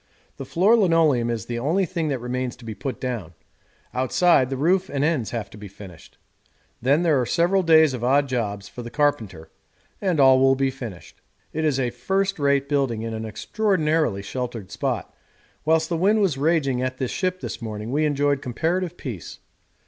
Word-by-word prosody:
The - - -6
floor 195 +7 +3
linoleum 165 - +3
is 115 -2 -3
the 120 -1 -4
only 165 +10 +1
thing 170 -2 -3
that 140 -3 -1
remains 125 +1 -3
to 125 -2 -15
be 110 - -5
put 130 +1 -5
down; 115 -10 -4 0.6
outside, 130 +2 +3
the 135 - -3
roof 180 +6 +2
and 140 0 -1
ends 150 -8 0
have 115 -4 -4
to 105 - -12
be 105 - -8
finished. 95 -4 -13 0.6
Then 140 +7 +3
there 155 -6 +3
are - - -1
several 180 +3 +2
days 160 -4 +5
of 120 -2 -5
odd 140 +3 +3
jobs 105 -6 -3
for 120 - -9
the 120 - -7
carpenter, 115 - -1 0.5
and 185 -6 0
all 135 -1 +6
will 135 0 +4
be 135 0 0
finished. 120 -9 -10 0.3
It 160 - -2
is 140 -3 +1
a 125 -2 0
first 195 +10 -1
rate 140 -1 +2
building 135 -6 0
in 115 0 -4
an 110 0 -4
extraordinarily 155 - 0
sheltered 120 -3 -5
spot; 115 0 -3 0.5
whilst 160 0 +3
the 170 - -1
wind 205 +6 +3
was 190 -8 +2
raging 140 -3 +1
at 130 0 -2
the 130 - -1
ship 185 +6 -2
this - - -6
morning 110 0 -5
we 150 +3 +1
enjoyed 145 -2 +1
comparative 170 +7 -2
peace. 110 - -7
135 Hz, 190 wpm, -23 LUFS, 120-160 Hz, 0.6 s, all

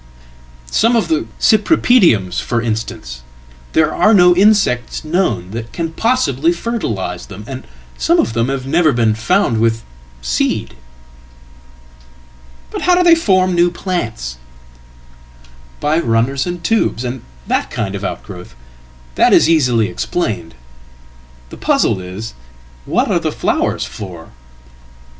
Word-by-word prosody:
Some 230 +2 +3
of 230 - +1
theCypripediums, 220 - +2
for 120 - -1
instance; 110 - -4 0.5
there 155 -1 +2
are 215 0 +4
no 180 -2 +6
insects 195 - +2
known 155 - -1
that 115 +1 -6
can 165 -1 -4
possiblyfertilise 170 - -1
them, 100 +1 -10
and 130 +1 -8 0.3
some - - +2
of 115 - +1
them 115 +2 0
have 135 -1 -3
never 155 +1 +2
been 115 -2 +2
found 110 +1 +1
with 115 0 +1 2.8
seed.""But 65 - -7
how 360 - +3
do 360 - +3
they 340 -1 +7
form 185 - +2
new 175 0 +3
plants?""By 65 - -6
runners 130 +2 0
and 175 -1 -5
tubers, 220 - 0
and 125 0 -4 0.2
that - - -1
kind 100 -3 -3
of 100 0 -5
outgrowth. 90 -8 -7 0.6
That - - +3
is - - +5
easilyexplained. 120 - 0 1.0
The - - -10
puzzle - - +1
is, 95 +5 -7 0.5
what - - 0
are - - +2
the - - -2
flowers - - -1
for?" 90 -5 -9
120 Hz, 115 wpm, -16 LUFS, -, 2.8 s, they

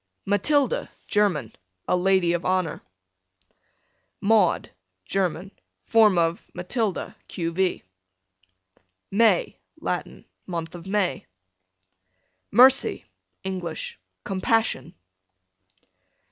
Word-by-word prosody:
Matilda, 285 - +1 0.2
German, 180 - +1 0.3
a - - +2
lady 180 -1 +2
of 175 - -2
honor. 185 -4 0 1.4
Maud, 205 -3 +2 0.3
German, 190 - -2 0.3
form 215 -5 +5
of 165 0 0
Malilda, 195 +2 -2
q.. 170 -2 -3
v. 185 +1 0 1.3
May, 230 - +3 0.2
Latin, - - -4 0.2
month 165 -3 -4
of 175 +1 -10
May. 190 -8 -1 1.2
Mercy, 255 +4 +5 0.4
English, 180 - -5 0.2
compassion. 185 - 0
190 Hz, 75 wpm, -24 LUFS, 175-210 Hz, 1.4 s, form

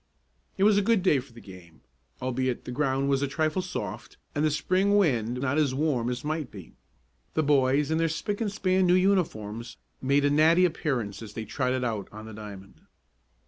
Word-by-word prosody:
It 195 - +1
was 205 0 +5
a - - +2
good 210 -2 +2
day 150 -7 +4
for 125 0 -11
the 115 - -13
game, 90 -6 -14 0.4
albeit 130 -1 -1
the - - -5
ground 135 0 0
was 140 -1 +2
a 140 - +1
trifle 155 +5 0
soft, 180 0 -6 0.2
and 145 - 0
the 155 - +4
Spring 185 +7 +2
wind 125 - +1
not 140 +3 0
as 140 -4 +1
warm 135 -5 0
as 125 +2 -4
might 155 -3 -2
be. 95 -5 -12 0.6
The 155 - +2
boys 140 0 +2
in 160 - +1
their 165 0 +2
spick 180 +8 -3
and 210 -3 0
span 190 -2 +1
new 175 - +5
uniforms 120 - 0 0.2
made 140 +2 +2
a 145 - +3
natty 160 +5 +5
appearance 130 - -2
as 105 -2 -9
they 110 - -4
trotted 130 +3 -1
out 110 -5 -2
on 110 +1 -9
the 110 - -9
diamond. 100 -2 -10
140 Hz, 200 wpm, -27 LUFS, 120-165 Hz, 0.6 s, was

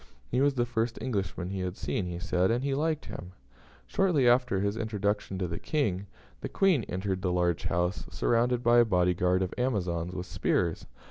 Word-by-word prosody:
He 125 - +2
was 140 0 +3
the 120 -2 +1
first 115 -1 -1
Englishman 95 -6 -3
he 100 - -3
had 90 +1 -3
seen, 95 - -2
he 85 -1 -4
said, 90 +1 +1
and 120 +3 +1
he 140 0 0
liked 155 +2 -1
him. 90 +1 -8 0.5
Shortly 170 -10 +2
after 120 -5 +3
his 100 +1 0
introduction 105 -3 -2
to 95 -1 -1
the 85 0 -4
King, 100 - -1 0.3
the - - -5
Queen 185 - +3
entered 95 +1 -3
the 90 - 0
large 90 -1 0
house, 90 +3 -1
surrounded 120 +1 +1
by 120 +1 +6
a 120 - +6
body 90 -4 +2
guard 90 +1 +2
of 90 - -4
Amazons 90 -8 -1
with 90 -1 -4
spears. 85 -2 -1
100 Hz, 195 wpm, -29 LUFS, 90-120 Hz, 0.5 s, by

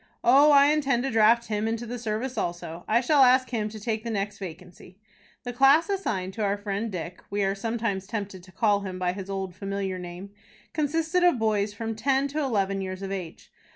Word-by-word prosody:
"Oh, 280 +5 +6
I 285 0 +6
intend 275 -5 +1
to 270 - -1
draft 225 +1 +4
him 215 -1 -2
into 230 +1 -2
the 245 +1 -5
service 230 +3 -3
also. 170 -1 -4
I 235 +2 +3
shall 280 +3 +3
ask 255 0 +5
him 215 -3 -1
to 215 0 -9
take 220 0 -3
the 235 - -4
next 200 -2 -3
vacancy." 180 0 -10 0.5
The 245 -1 -5
class 275 +8 +5
assigned 195 - -2
to 220 - -3
our 200 0 +1
friend 205 +2 -3
Dick 180 -1 -6
(we 205 0 -1
are 195 0 +1
sometimes 215 -2 -3
tempted 200 -4 -5
to 185 +1 -17
call 205 +2 +2
him 190 -2 -6
by 180 -1 -1
his 195 0 -7
old, 190 -2 -4
familiar 195 -1 -3
name) 180 +2 -8 0.4
consisted 325 +4 0
of 350 -7 +4
boys 210 -2 0
of - - -20
from 225 0 -3
ten 270 +5 +1
to 300 +3 -3
eleven 200 -8 0
years 185 0 -5
of 195 - -4
age. 180 -4 -7
215 Hz, 215 wpm, -26 LUFS, 195-245 Hz, 0.5 s, Oh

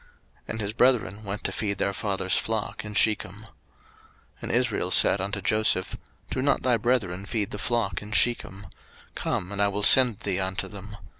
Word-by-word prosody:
01:037:012 - - -28 0.4
And 110 - -4
his 105 0 -3
brethren 115 -4 +2
went 100 0 -5
to - - -1
feed 100 -3 -3
their 100 - 0
father's 95 -2 -1
flock 110 -1 -2
in 105 -1 -7
Shechem. 105 -3 +1
01:037:013 110 - -15 0.9
And - - -4
Israel 120 -7 0
said 95 +1 +5
unto 100 +1 -3
Joseph, 110 -1 +1 0.4
Do 130 - -2
not 140 +1 +1
thy 125 -2 +2
brethren 105 -5 -1
feed 105 -3 -2
the 105 - -6
flock 100 -4 -1
in 105 0 -9
Shechem? 110 -3 0 0.5
come, 90 +2 -3
and 100 0 -3
I 100 - +3
will 100 +1 -3
send 125 -1 +6
thee 95 -2 -1
unto 95 0 -3
them. 105 +1 -10
105 Hz, 190 wpm, -26 LUFS, 95-110 Hz, 0.9 s, send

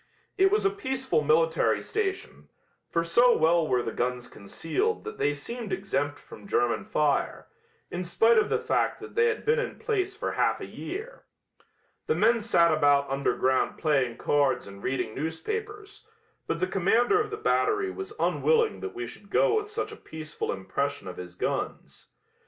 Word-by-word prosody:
It 385 0 +4
was 420 +1 +1
a 395 - +4
peaceful 265 - -1
military 160 +2 +3
station, 390 -3 -4 0.4
for 170 - 0
so 240 +9 +4
well 165 0 +3
were 125 -3 +1
the 115 - -3
guns 125 +1 -2
concealed 270 - -2
that 440 0 -8
they 145 - +2
seemed 215 +9 -6
exempt 145 -7 -1
from - - -13
German 120 -10 +1
fire, 150 -2 0 0.5
in 180 +1 -3
spite 225 +6 +4
of - - 0
the - - +2
fact - - 0
that - - -10
they 460 0 +3
had 450 -2 -2
been 460 +2 +3
in - - -3
place 390 -4 -1
for - - -2
half - - +1
a - - -6
year. 445 +6 -7 0.8
The 460 - +2
men 235 0 +4
sat 170 -7 +3
about 145 -2 +3
underground 130 -1 +1
playing 135 -7 +1
cards 145 -2 +1
and 100 0 -11
reading 130 -4 -2
newspapers, 415 - -5 0.4
but 165 - -1
the 185 - +2
commander 225 - +2
of 425 - -3
the 425 - -5
battery 420 -2 +1
was 390 +2 -7
unwilling 460 -2 +2
that 395 - -6
we 365 0 -4
should 205 - -12
go 430 - +3
with 415 - -10
such 425 - -3
a - - -8
peaceful 155 -1 -6
impression 140 +8 -3
of 90 - -7
his 90 -1 -8
guns. - - -4
195 Hz, 175 wpm, -27 LUFS, -, 0.8 s, It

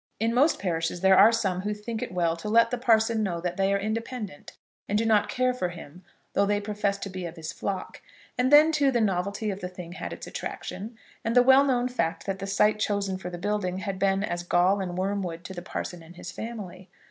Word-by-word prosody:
In 225 +2 +1
most 280 +6 +4
parishes 170 -2 -2
there 190 0 +6
are 225 - +8
some 195 -6 0
who 210 +2 -2
think 220 +2 -5
it - - -4
well 170 -2 +1
to 190 +6 -6
let 230 +1 +4
the 245 - 0
parson 225 -2 +3
know 180 -5 -1
that 175 +1 -3
they 195 +1 +1
are 200 - +3
independent 220 - -5 0.4
and 205 - +2
do 225 - +1
not 215 -2 +3
care 255 0 +1
for 185 -8 -2
him, 175 0 -11 0.3
though 200 - +2
they 205 0 +2
profess 205 -1 -1
to 200 - -6
be 185 -2 -5
of 165 - -9
his 160 -2 -6
flock; 195 -2 -5 0.3
and 250 +2 +1
then, 300 +2 +8
too, 295 -3 +3
the 245 -3 +1
novelty 200 +1 0
of 195 +1 -6
the 180 - -4
thing 180 -2 -9
had 180 - -6
its - - -7
attraction, 220 +3 -6 0.3
and 230 +1 -1
the 245 - +7
well 265 +2 +7
known 250 -3 +1
fact 245 -10 -2
that 195 -1 -3
the 195 - -5
site 210 +2 +2
chosen 200 -2 -1
for 180 - -6
the 175 - -6
building 185 -1 -1
had 190 0 -4
been 195 0 +2
as 175 -4 -2
gall 180 +3 +2
and 180 -2 -4
wormwood 185 -3 -2
to 190 - -7
the 175 - -6
parson 175 -1 -5
and 165 +2 -14
his - - -8
family. 205 -5 -7
200 Hz, 240 wpm, -27 LUFS, 180-225 Hz, 0.4 s, are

